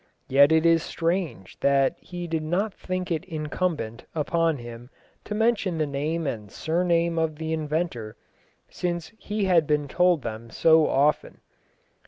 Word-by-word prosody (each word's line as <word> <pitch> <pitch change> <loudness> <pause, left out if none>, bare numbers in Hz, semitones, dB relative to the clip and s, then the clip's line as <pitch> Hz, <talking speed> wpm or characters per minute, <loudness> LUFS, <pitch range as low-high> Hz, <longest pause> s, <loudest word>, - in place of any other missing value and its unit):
Yet 140 +3 +6
it 160 +1 +4
is 165 -1 +5
strange 165 - -3
that 140 -1 +3
he 175 -1 -7
did 160 -2 -2
not 185 +7 -1
think 185 0 -4
it 165 0 -1
incumbent 155 -7 -3
upon 165 0 +1
him 120 0 -10 0.4
to 210 - -4
mention 210 -6 +1
the 155 - +1
name 150 +4 -2
and 105 -7 -4
surname 170 0 +1
of 160 -1 0
the 160 +1 -3
inventor, 150 -8 -3 0.5
since 175 -1 -3
he 210 -1 -2
had 170 -5 +3
been 150 -1 +1
told 180 -1 +2
them 115 0 -6
so 160 +6 +4
often. 145 +3 +1
160 Hz, 150 wpm, -25 LUFS, 140-175 Hz, 0.5 s, Yet